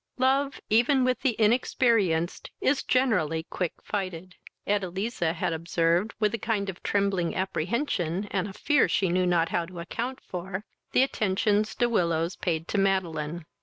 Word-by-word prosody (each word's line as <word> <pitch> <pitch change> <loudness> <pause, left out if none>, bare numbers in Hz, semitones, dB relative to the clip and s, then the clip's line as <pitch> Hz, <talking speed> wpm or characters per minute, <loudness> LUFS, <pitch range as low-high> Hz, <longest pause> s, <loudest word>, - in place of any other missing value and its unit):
Love 270 +2 +2
even 245 +5 +4
with 255 -1 +1
the 255 -5 +1
inexperienced 215 -6 +2
is 275 +1 +2
generally 180 - +1
quick 180 -3 -2
fighted. 185 -2 -4 0.3
Edeliza 195 -2 -1
had 170 0 -1
observed, 170 +4 0
with 210 -2 +2
a 230 - -2
kind 215 -3 -1
of 175 - -17
trembling 200 -4 0
apprehension, 190 - -1
and 195 0 0
a 195 - -8
fear 295 +7 +2
she 190 - +1
knew 180 +1 +2
not 170 -2 +2
how 170 - 0
to 175 +1 -9
account 240 +9 -4
for, 185 +3 -6 0.3
the 255 - +5
attentions 210 -2 +1
De 240 - +2
Willows 170 -5 +1
paid 165 -1 -2
to 205 - 0
Madeline. 170 -4 0
195 Hz, 155 wpm, -27 LUFS, 170-230 Hz, 0.3 s, the